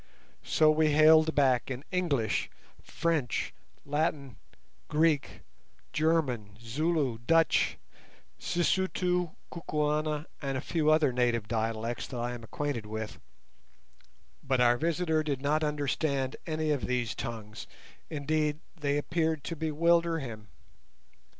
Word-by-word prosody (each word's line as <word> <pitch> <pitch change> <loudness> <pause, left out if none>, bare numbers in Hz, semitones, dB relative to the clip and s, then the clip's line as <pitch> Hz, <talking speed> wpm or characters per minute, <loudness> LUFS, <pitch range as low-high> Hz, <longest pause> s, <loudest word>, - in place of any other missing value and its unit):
So 155 -1 +4
we 155 0 +3
hailed 155 +1 +6
back 130 -4 +3
in 130 +1 -5
English, 145 - 0 0.3
French, 160 -7 -1 0.3
Latin, 145 -3 -1 0.5
Greek, 155 -1 +1 0.5
German, 135 -10 0
Zulu, 135 +1 -1
Dutch, 165 0 +3 0.6
Sisutu, 180 -1 0 0.2
Kukuana, 150 -1 -1 0.2
and 135 -2 -2
a - - -1
few 155 0 0
other 155 -4 +4
native 120 -3 +1
dialects 115 +1 -2
that 125 - -6
I 120 +1 -2
am 120 -1 -8
acquainted 120 -2 -3
with, 110 0 -5 1.2
but 135 -1 0
our 120 0 +4
visitor 160 -1 +1
did 145 -4 -2
not 150 +3 +1
understand 145 -2 -1
any 155 -1 -1
of 145 -3 -1
these 125 -2 -1
tongues; 110 -2 -6 0.4
indeed, 150 0 -1 0.2
they 145 -3 0
appeared 160 0 0
to 165 - -4
bewilder 165 +2 +2
him. 115 -7 -7
150 Hz, 115 wpm, -30 LUFS, 125-160 Hz, 1.2 s, hailed